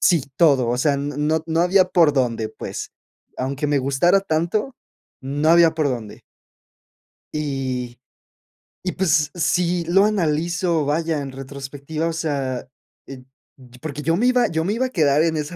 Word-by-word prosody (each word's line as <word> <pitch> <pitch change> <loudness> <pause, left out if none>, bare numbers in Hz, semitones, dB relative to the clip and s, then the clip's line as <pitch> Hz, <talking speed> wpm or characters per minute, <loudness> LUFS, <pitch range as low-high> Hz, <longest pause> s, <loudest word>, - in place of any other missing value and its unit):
sí, 165 -7 +3
todo. 140 -7 +4
O 120 - 0
sea, 140 +2 +2
no 150 +3 -1
no 165 0 0
había 185 +2 +4
por 170 -5 +4
dónde, 115 -5 0
pues, - - -7 0.5
aunque 135 +3 -2
me 145 0 +1
gustara 140 +8 +2
tanto, 195 - -1 0.5
no 145 +4 0
había 170 -1 +6
por 155 -3 0
dónde. 120 -5 -6 1.1
Y, 130 -5 -3 0.8
y 185 - -1
pues 155 -5 +1
sí 175 0 0
lo 195 +4 +4
analizo, 170 -3 0
vaya, 155 +1 0
en 135 -1 -6
retrospectiva, 140 +4 -5
o 165 - -2
sea, 140 -6 -2 0.5
eh, 135 - -8 0.4
t 125 -2 -17
porque 150 -2 -5
yo 165 +2 +1
me 230 - +1
iba 250 -1 +3
yo 160 0 -1
me 195 +5 -1
iba 255 +3 0
a - - -9
quedar 150 - +2
en 160 -2 0
esa 150 +4 -4
155 Hz, 160 wpm, -21 LUFS, 140-170 Hz, 1.1 s, había